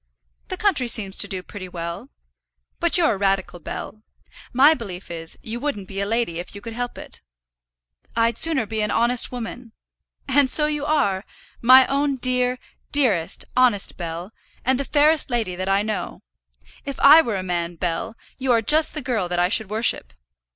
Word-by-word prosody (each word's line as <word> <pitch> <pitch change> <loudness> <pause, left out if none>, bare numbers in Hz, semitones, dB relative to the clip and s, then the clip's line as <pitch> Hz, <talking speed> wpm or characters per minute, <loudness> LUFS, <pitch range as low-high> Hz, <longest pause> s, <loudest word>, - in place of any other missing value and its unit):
"The 370 - -5
country 370 -12 +1
seems 205 -4 0
to - - +3
do 190 -3 -5
pretty 185 -1 -9
well. 170 -1 -6 0.7
But 340 +1 +5
you're 325 -8 +3
a - - -4
radical, 195 -2 -1
Bell. 215 +5 -7 0.5
My 275 +5 +6
belief 195 - -8
is, 165 -1 -6
you 230 +2 -5
wouldn't 240 -9 -4
be 195 0 -6
a 200 - -1
lady 225 -7 -1
if 180 - -8
you - - -7
could 230 +2 -8
help 245 +1 -5
it." - - -9 0.9
"I'd 230 0 +2
sooner 305 -3 +1
be 220 +1 -3
an 210 - -1
honest 235 +3 +2
woman." 240 -1 -7 0.5
"And 280 0 +3
so 300 +3 +6
you 295 -1 -2
are, 200 -11 +1 0.4
my 255 +2 +8
own 280 0 0
dear, 250 0 0 0.3
dearest, 225 - +1
honest 245 -6 +2
Bell, 170 +2 -6 0.3
and 260 +1 +2
the 280 - -2
fairest 300 +1 +3
lady 225 -7 -2
that 185 +1 -4
I 195 +1 +2
know. 215 -1 -5 0.6
If 275 - -6
I 300 +4 +8
were 230 -9 -3
a 185 - -4
man, 175 -1 -3
Bell, 170 +6 -3 0.2
you 260 -1 0
are 230 -1 +2
just 310 +6 +4
the 305 - -4
girl 225 -8 -1
that 175 - -2
I 175 +1 +2
should 215 0 -1
worship." 215 - -1
230 Hz, 185 wpm, -22 LUFS, 190-265 Hz, 0.9 s, my